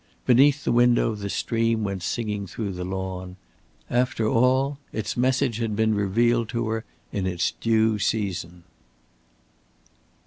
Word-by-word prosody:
Beneath 140 +3 +5
the - - 0
window 120 -1 +3
the 100 -1 -5
stream 115 +1 0
went 100 -2 -3
singing 105 0 -3
through 100 +2 -4
the 90 -1 -5
lawn. 95 0 -5 0.5
After 120 -2 0
all, 130 +4 +2
its 110 -1 -3
message 130 -1 +1
had 115 -3 -1
been 110 0 +2
revealed 115 +3 +1
to 115 -2 -2
her 110 0 -3 0.3
in 95 -2 -2
its 90 -2 0
due 110 -1 +2
season. 90 -5 -2
110 Hz, 135 wpm, -24 LUFS, 100-120 Hz, 0.5 s, Beneath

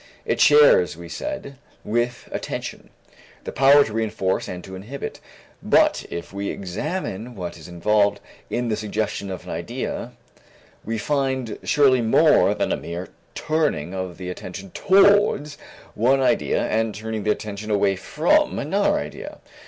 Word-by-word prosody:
It - - 0
shares, 465 +1 +6
we - - -10
said, 295 - -6 0.3
with 120 +2 -2
attention, - - -5 0.5
the - - -5
power 140 +2 +6
to 110 - -7
reënforce 105 -4 -1
and 90 -1 -6
to 95 - -10
inhibit. 115 +9 -7 0.4
But - - +3
if 85 +2 -7
we 100 0 -3
examine 115 - -4
what 90 -3 -6
is - - -12
involved 100 +4 +1 0.3
in 120 -1 -1
the 110 - +1
suggestion 105 -1 -3
of 95 - -6
an - - -8
idea, - - -4 0.7
we 115 +1 -3
find 130 -2 -1
surely 135 -4 +3
more 110 -1 +4
than - - -1
a - - +1
mere 85 +2 -6 0.3
turning 150 - -1
of 95 -2 -5
the 90 -1 -5
attention 90 +1 -8
towards 195 -7 +3 0.3
one 130 +5 +3
idea 130 - +1
and 110 -1 0
turning 110 0 -4
the 105 - -2
attention 105 0 -3
away 100 -2 +2
from 95 - +1
another - - +1
idea. - - -7
110 Hz, 145 wpm, -23 LUFS, 95-135 Hz, 0.7 s, shares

